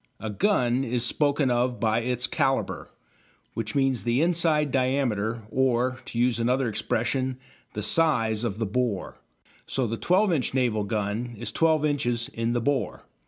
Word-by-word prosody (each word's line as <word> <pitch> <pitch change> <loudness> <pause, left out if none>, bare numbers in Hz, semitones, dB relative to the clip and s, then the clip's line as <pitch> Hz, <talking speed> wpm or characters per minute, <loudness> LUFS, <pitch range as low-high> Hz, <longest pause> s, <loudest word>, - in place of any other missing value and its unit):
A 110 - -4
gun 130 - +1
is 120 -1 0
spoken 145 0 +1
of 120 0 0
by 110 0 +2
its 125 +1 0
"calibre," 135 -2 -1 0.7
which 110 -2 -4
means 135 -3 +1
the 120 +5 +1
inside 165 -4 +2
diameter, 120 -4 0
or, 130 -1 +1
to - - -7
use 120 0 +2
another 125 +2 +1
expression, 125 +4 -1 0.4
the 105 - -4
size 115 -6 +2
of 110 -4 -2
the 110 - -1
"bore." 110 -2 -2 0.5
So 130 - -1
the 115 0 -3
"12 185 - +2
inch" 135 -6 -1
naval 115 -5 +1
gun 110 +3 -2
is 120 - -4
12 160 -2 +2
inches 120 -5 -1
in 115 +1 -2
the 120 - 0
bore. 140 +1 -1
125 Hz, 160 wpm, -26 LUFS, 115-135 Hz, 0.7 s, by